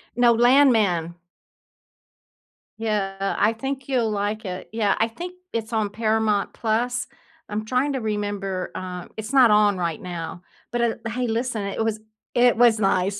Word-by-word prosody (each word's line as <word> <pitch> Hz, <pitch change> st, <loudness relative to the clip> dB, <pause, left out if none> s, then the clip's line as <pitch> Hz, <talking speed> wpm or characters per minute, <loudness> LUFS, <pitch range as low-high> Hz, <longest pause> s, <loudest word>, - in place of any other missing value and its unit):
No, 240 Hz, -1 st, +5 dB
Landman. 225 Hz, -, +4 dB, 1.6 s
Yeah, 195 Hz, -3 st, -1 dB
I 215 Hz, +2 st, +3 dB
think 265 Hz, +3 st, -5 dB
you'll 240 Hz, -4 st, +1 dB
like 210 Hz, +1 st, -2 dB
it. 185 Hz, 0 st, -6 dB
Yeah, 220 Hz, -3 st, +1 dB
I 225 Hz, -, +3 dB
think 350 Hz, +11 st, -7 dB, 0.2 s
it's 225 Hz, 0 st, -4 dB
on 215 Hz, -2 st, +1 dB
Paramount+. 220 Hz, +2 st, 0 dB, 0.4 s
I'm 215 Hz, +1 st, -3 dB
trying 260 Hz, +4 st, 0 dB
to 260 Hz, -, -2 dB
remember, 205 Hz, -3 st, -3 dB
uh 180 Hz, -1 st, -6 dB
It's 220 Hz, +4 st, -5 dB
not 255 Hz, -4 st, +7 dB
on 210 Hz, -2 st, +4 dB
right 170 Hz, -3 st, -2 dB
now. 175 Hz, 0 st, -6 dB, 0.3 s
But 240 Hz, 0 st, -1 dB
at 235 Hz, -1 st, 0 dB
l 230 Hz, -, -2 dB
Hey, 250 Hz, +1 st, -1 dB
listen, 230 Hz, -1 st, -1 dB
it 200 Hz, +3 st, -2 dB
was 220 Hz, -1 st, -1 dB, 0.4 s
i -, -, +2 dB
it 245 Hz, -1 st, +5 dB
was 235 Hz, -2 st, +5 dB
nice. 195 Hz, 0 st, +1 dB
220 Hz, 160 wpm, -23 LUFS, 200-240 Hz, 1.6 s, not